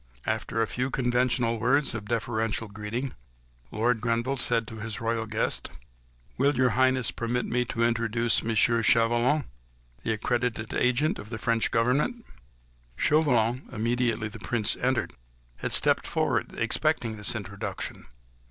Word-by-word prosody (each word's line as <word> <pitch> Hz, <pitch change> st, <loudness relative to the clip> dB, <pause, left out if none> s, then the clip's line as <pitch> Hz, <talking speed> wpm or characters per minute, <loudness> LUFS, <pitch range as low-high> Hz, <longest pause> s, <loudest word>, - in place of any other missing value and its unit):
After -, -, -2 dB
the 115 Hz, -, +3 dB
few 125 Hz, +4 st, -2 dB
conventional 125 Hz, -2 st, +1 dB
words 135 Hz, +5 st, +2 dB
of 110 Hz, -2 st, -5 dB
deferential 115 Hz, -1 st, -1 dB
greeting, 105 Hz, +6 st, -4 dB, 0.6 s
Lord 115 Hz, +1 st, 0 dB
Grenville 120 Hz, +3 st, 0 dB
said 115 Hz, -3 st, +2 dB
to 110 Hz, -, -9 dB
his 110 Hz, -1 st, -5 dB
royal 115 Hz, 0 st, -1 dB
guest,— 110 Hz, 0 st, -1 dB, 0.7 s
"Will 140 Hz, +1 st, +3 dB
your 130 Hz, -1 st, +3 dB
Highness 130 Hz, -1 st, +2 dB
permit 120 Hz, +1 st, -2 dB
me 125 Hz, +1 st, 0 dB
to 115 Hz, 0 st, -2 dB
introduce 115 Hz, 0 st, +1 dB
M. 115 Hz, 0 st, -1 dB
Chauvelin, 120 Hz, +4 st, +3 dB, 0.6 s
the 110 Hz, -, -1 dB
accredited 115 Hz, 0 st, -2 dB
agent 125 Hz, +5 st, +1 dB
of 105 Hz, -, -9 dB
the 110 Hz, -, -4 dB
French 115 Hz, +3 st, +1 dB
Government?" 140 Hz, -, +1 dB, 0.7 s
Chauvelin, 130 Hz, -5 st, +2 dB
immediately 115 Hz, -1 st, 0 dB
the 105 Hz, -, -9 dB
Prince 110 Hz, -4 st, 0 dB
entered, 125 Hz, -2 st, 0 dB, 0.4 s
had -, -, -4 dB
stepped -, -, +3 dB
forward, -, -, 0 dB
expecting 115 Hz, -2 st, +1 dB
this 105 Hz, +2 st, -3 dB
introduction. 100 Hz, -2 st, -4 dB
115 Hz, 135 wpm, -27 LUFS, 110-125 Hz, 0.7 s, the